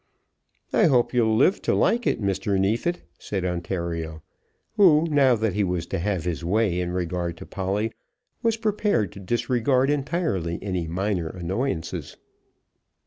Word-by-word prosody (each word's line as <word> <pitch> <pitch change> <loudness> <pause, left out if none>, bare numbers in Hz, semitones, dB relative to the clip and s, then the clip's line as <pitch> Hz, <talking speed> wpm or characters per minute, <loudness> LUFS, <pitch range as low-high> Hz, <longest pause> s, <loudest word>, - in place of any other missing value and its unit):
"I - - +5
hope 125 -5 +3
you'll 110 -3 +3
live 160 - +3
to - - +1
like 235 0 +2
it, - - +1
Mr. 100 -1 0
Neefit," 115 - 0 0.2
said 95 -3 -3
Ontario, 85 -3 -3 0.5
who, 165 -6 +6
now 135 -4 +5
that 110 -3 -1
he 105 - +1
was 90 -3 -1
to 95 - -3
have 95 -2 -1
his 85 -1 -2
way 95 0 +1
in 90 -1 -2
regard 85 -1 -2
to - - -9
Polly, 100 +3 -2 0.5
was 230 -2 +1
prepared 210 - 0
to - - -11
disregard 120 +6 +1
entirely 140 - -1
any 90 -4 -3
minor 90 0 -1
annoyances. 95 +2 -3
100 Hz, 145 wpm, -25 LUFS, 90-130 Hz, 0.5 s, who